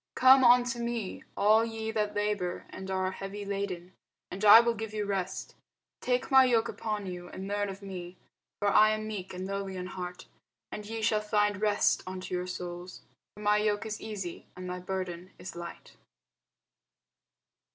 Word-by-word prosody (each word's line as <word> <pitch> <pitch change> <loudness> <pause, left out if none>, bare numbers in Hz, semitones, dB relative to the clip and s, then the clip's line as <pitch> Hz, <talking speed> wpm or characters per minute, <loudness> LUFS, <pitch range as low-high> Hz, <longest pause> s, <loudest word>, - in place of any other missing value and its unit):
Come 260 +1 +7
unto 245 0 +5
me, 235 -4 -3
all 215 +2 +5
ye 225 -1 -3
that 210 -1 -1
labour 205 -4 -1
and 190 0 -7
are 185 0 0
heavy 195 +2 -6
laden, 195 -3 -4 0.4
and 195 +3 -6
I 210 +2 +11
will 235 0 +2
give 220 -1 -6
you 210 -1 -1
rest. 190 -2 -3 0.5
Take 250 +1 -1
my 265 0 +8
yoke 235 -3 +3
upon 210 -2 -3
you, 180 -1 -6
and 190 +1 -7
learn 205 0 -1
of 195 +1 -8
me; 180 -2 -7 0.4
for 205 - +2
I 215 +1 +6
am 215 0 -5
meek 200 -4 -5
and 185 0 -5
lowly 195 0 -4
in 180 - -4
heart: 180 -1 -6 0.5
and 210 -1 -6
ye 225 0 -4
shall 215 0 +2
find 210 -2 +1
rest 210 -1 +3
unto 185 0 -6
your 180 0 -1
souls. 180 0 -7 0.3
For 210 - -11
my 210 0 +4
yoke 210 0 0
is 215 -1 -5
easy, 195 -6 -6
and 185 - -7
my 180 0 -4
burden 185 -1 -5
is 185 - -8
light. 170 0 -9
205 Hz, 175 wpm, -30 LUFS, 185-215 Hz, 0.5 s, I